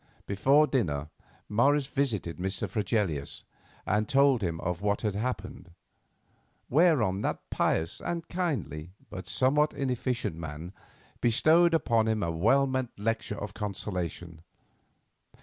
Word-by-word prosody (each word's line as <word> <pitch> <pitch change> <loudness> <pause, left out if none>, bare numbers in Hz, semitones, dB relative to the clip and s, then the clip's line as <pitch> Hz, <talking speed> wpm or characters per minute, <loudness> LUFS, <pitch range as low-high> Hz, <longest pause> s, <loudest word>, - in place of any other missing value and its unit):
Before 135 +10 +4
dinner 80 - -1 0.4
Morris 140 +7 +3
visited 115 - -2
Mr. 95 +2 -2
Fregelius, 100 - -1 0.4
and 105 +1 0
told 135 -3 +4
him 85 -4 -2
of 90 +1 -2
what 100 0 0
had 105 -3 0
happened; 100 -4 -4 1.0
whereon 130 - +3
that - - -3
pious 80 +1 0
and 170 -1 -3
kindly, 95 - -3 0.2
but 90 -3 -7
somewhat 150 +4 +2
inefficient 130 - -1
man, 80 +2 -7 0.5
bestowed 160 +8 +4
upon 115 -8 +2
him 110 -2 +1
a 85 - 0
well 115 +12 +3
meant 130 -2 -3
lecture 110 0 -2
of 100 0 -6
consolation. 90 -6 -4
110 Hz, 120 wpm, -29 LUFS, 90-135 Hz, 1.0 s, Before